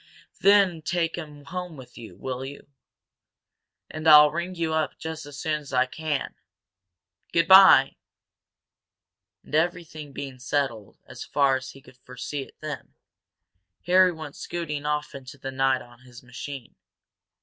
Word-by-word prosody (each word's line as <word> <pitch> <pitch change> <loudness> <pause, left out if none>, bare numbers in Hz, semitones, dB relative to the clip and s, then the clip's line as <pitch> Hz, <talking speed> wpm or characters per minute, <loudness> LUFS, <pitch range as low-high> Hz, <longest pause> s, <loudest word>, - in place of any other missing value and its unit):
Then 195 -4 +4
take 165 0 -1
him 150 -4 -9
home 180 0 -6
with 125 -1 -13
you, 110 -6 -11
will 130 +3 -5
you? 140 +1 -9 1.2
And 155 +1 -5
I'll 150 -1 +9
ring 170 +3 -4
you 165 -2 -2
up 155 -1 -1
just 160 -2 -7
as 145 -1 -10
soon 155 +1 -1
as 140 -2 -12
I 125 - +3
can. 150 +1 -3 1.0
Good 165 - +2
bye!" 190 0 +8 1.5
And - - -17
everything 155 -2 -1
being 135 -2 -7
settled 125 -5 -2
as - - -9
far 140 -2 +2
as 130 0 -9
he 135 - -15
could 130 - -18
foresee 130 +3 -6
it - - -12
then, 155 -2 -7 0.9
Harry 185 +1 +5
went 155 -3 -9
scooting 150 -4 -5
off 150 0 -2
into 135 0 -10
the 135 0 -6
night 135 0 +1
on 120 -1 -18
his 125 -1 -15
machine. 125 +1 -8
150 Hz, 150 wpm, -25 LUFS, 135-160 Hz, 1.5 s, I'll